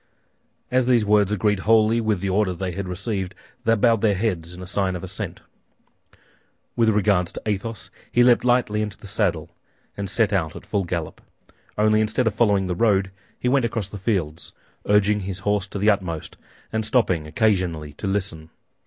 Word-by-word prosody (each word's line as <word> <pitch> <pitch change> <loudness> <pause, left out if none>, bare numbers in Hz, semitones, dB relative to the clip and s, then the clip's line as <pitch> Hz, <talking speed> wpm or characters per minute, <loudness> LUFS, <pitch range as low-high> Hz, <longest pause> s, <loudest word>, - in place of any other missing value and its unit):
As 125 -1 +2
these 120 -4 +4
words 105 -1 +3
agreed 105 0 +1
wholly 110 +2 +3
with 110 -5 0
the 100 - -1
order 95 -1 +1
they 90 +1 -3
had 100 +1 -5
received, 95 +1 -3 0.3
they 115 0 +4
bowed 115 0 +3
their 105 -3 +3
heads 90 -5 -2
in 90 +1 -9
sign 95 0 -1
of 90 - -6
assent. - - -5 1.3
With 115 -2 +3
regard 100 -4 +2
to - - -6
Athos, 105 +1 -3 0.2
he 120 - +4
leaped 120 -1 +5
lightly 120 -4 +2
into 105 -2 -4
the - - -15
saddle 95 -6 -1 0.4
and 100 -1 -4
set 105 +1 +2
out 85 -5 0
at - - -10
full 100 -2 -1
gallop; 85 -2 -4 0.6
only 110 0 +3
instead 110 +3 +1
of 115 - +1
following 100 -3 +2
the 90 - -1
road, 95 -1 +2 0.3
he - - -2
went 135 +1 +3
across 115 -4 -2
the 105 - -8
fields, 85 -6 -2 0.3
urging 105 0 +3
his 95 -2 -4
horse 105 +1 0
to 100 - -6
the 105 +2 +4
utmost 90 -6 -3 0.4
and 110 0 0
stopping 105 -9 +1
occasionally 85 -5 0
to 100 - -5
listen. 95 -5 -2
100 Hz, 180 wpm, -23 LUFS, 90-110 Hz, 1.3 s, leaped